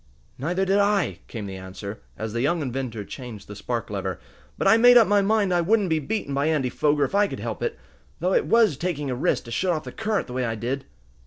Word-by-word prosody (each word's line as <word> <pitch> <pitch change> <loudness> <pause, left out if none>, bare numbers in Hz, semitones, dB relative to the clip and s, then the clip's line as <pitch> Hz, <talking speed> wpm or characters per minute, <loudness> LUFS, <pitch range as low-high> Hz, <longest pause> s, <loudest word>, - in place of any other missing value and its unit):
"Neither 180 +8 0
did 195 +2 +3
I," 200 -4 +1
came 110 -4 -6
the 95 -1 -6
answer, 95 +3 -8 0.2
as 110 -1 -4
the 115 - -1
young 155 +4 +1
inventor 125 -5 -4
changed 120 -5 -9
the 105 - -8
spark 115 +2 -4
lever. 95 -3 -3 0.4
"But - - +1
I - - +7
made 245 +2 +7
up 230 - +6
my 205 0 +4
mind 200 -2 +2
I 175 - +3
wouldn't 205 +2 +2
be 160 - +3
beaten 150 0 -3
by 140 +2 +1
Andy 150 -5 +1
Foger, 145 +2 +1
if 140 - -1
I 205 0 +4
could - - -6
help - - -5
it. 470 - -2 0.4
Though - - +1
it 485 -3 +2
was 225 - +4
taking 150 -5 -2
a - - -1
risk 125 - 0
to 115 - -10
shut 180 +8 +1
off 155 - -3
the - - -7
current 220 -2 -1
the 125 - -9
way 130 0 -1
I 115 -2 -1
did." 125 +5 -3
145 Hz, 250 wpm, -24 LUFS, -, 0.4 s, I